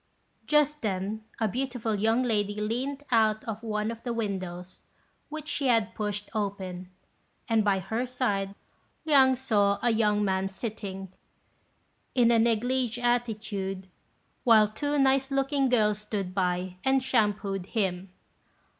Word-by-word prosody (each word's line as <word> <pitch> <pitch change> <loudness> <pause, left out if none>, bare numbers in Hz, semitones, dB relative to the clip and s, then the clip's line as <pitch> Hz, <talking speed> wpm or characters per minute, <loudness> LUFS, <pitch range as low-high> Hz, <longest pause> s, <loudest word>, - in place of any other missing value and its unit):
Just 300 0 +3
then 205 +1 -2 0.2
a 220 - +2
beautiful 245 0 -2
young 225 +4 +2
lady 205 -4 0
leant 255 +7 -2
out 220 -2 +3
of 225 -1 -5
one 215 -1 -2
of 230 0 -8
the 240 - -3
windows, 185 -5 -4 0.5
which 310 0 -7
she 280 -2 -1
had 225 -3 +2
pushed 205 -2 -3
open, 190 -4 -4 0.6
and 225 -2 +3
by 200 -2 +2
her 225 +7 -2
side 200 -6 -1 0.5
Liang 270 -4 +5
saw 205 -6 +2
a 240 - +4
young 210 -2 +2
man 190 0 0
sitting, 195 -3 -6 1.0
in 240 -2 +5
a 230 - +4
négligé 235 +2 +1
attitude, 215 -6 -2 0.6
while 220 -3 +6
two 290 +7 -2
nice 270 0 +3
looking 275 0 +1
girls 210 -4 +2
stood 205 -3 -4
by 180 -1 -1
and 265 0 +2
shampooed 205 -6 0
him. 190 -4 -2
220 Hz, 135 wpm, -28 LUFS, 200-245 Hz, 1.0 s, while